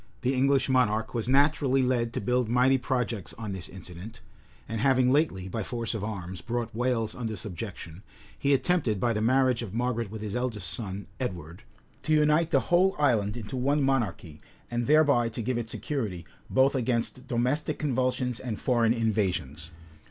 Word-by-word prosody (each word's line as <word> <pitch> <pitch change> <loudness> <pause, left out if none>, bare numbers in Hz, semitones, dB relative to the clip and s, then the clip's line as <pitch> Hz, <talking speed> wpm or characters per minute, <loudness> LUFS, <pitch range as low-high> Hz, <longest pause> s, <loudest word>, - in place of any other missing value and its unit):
The 130 +2 +1
English 135 0 +2
monarch 110 -4 +1
was 115 0 -2
naturally 140 -1 +3
led 120 -2 +1
to - - -1
build 125 +2 +1
mighty 130 +2 +4
projects 120 -6 -2
on 110 -3 -5
this 95 -3 -6
incident; 95 +4 -10 0.5
and 115 -1 -3
having 130 -1 +4
lately, 130 - +1
by 110 +4 -3
force 115 +2 -3
of 110 -3 -4
arms, 95 -4 -5
brought 120 -1 -3
Wales 115 -2 0
under 110 -3 -4
subjection, 90 -3 -7 0.3
he 140 - 0
attempted, 135 - +2
by 120 +3 +1
the 105 - -1
marriage 130 +1 +3
of 110 -3 -6
Margaret 120 -2 -1
with 110 +1 -7
his 105 0 -4
eldest 110 -8 -2
son, 100 0 -4
Edward, 90 - -5 0.4
to 155 - 0
unite 150 +2 +3
the - - +3
whole 185 +2 +4
island 115 -7 +2
into 115 +3 -6
one 140 +3 +1
monarchy, 105 - -1 0.3
and 120 0 -1
thereby 145 -6 +4
to 115 +1 -5
give 125 +1 -1
it 115 -1 -5
security 110 - -4 0.2
both 135 +1 +4
against 125 0 -1
domestic 130 +6 0
convulsions 130 -3 -1
and 120 -5 -4
foreign 120 -3 +2
invasions. 95 - -1
120 Hz, 170 wpm, -28 LUFS, 105-130 Hz, 0.5 s, mighty